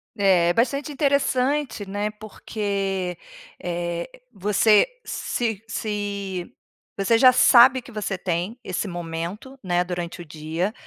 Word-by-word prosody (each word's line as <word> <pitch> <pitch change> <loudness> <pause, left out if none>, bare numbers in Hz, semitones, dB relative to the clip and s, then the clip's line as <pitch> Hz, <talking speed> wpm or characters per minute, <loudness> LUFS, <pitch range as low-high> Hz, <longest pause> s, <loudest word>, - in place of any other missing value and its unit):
É, 185 -5 +4
bastante 275 +6 0
interessante, 280 -4 +1
né, 205 +2 -2
porque, 200 -4 -3 0.4
eh, 170 -1 -3 0.2
você 210 - +4 0.2
se 225 -4 -2
se 200 -4 -4 0.5
Você 195 +4 +3
já 255 0 +8
sabe 255 +1 +7
que - - -13
você 210 -3 -3
tem 180 +5 -2
esse 185 +1 -3
momento, 175 +8 -5
né, 175 -1 +1
durante 175 -1 -5
o 175 - -8
dia, 160 +6 -3
200 Hz, 115 wpm, -23 LUFS, 175-230 Hz, 0.5 s, já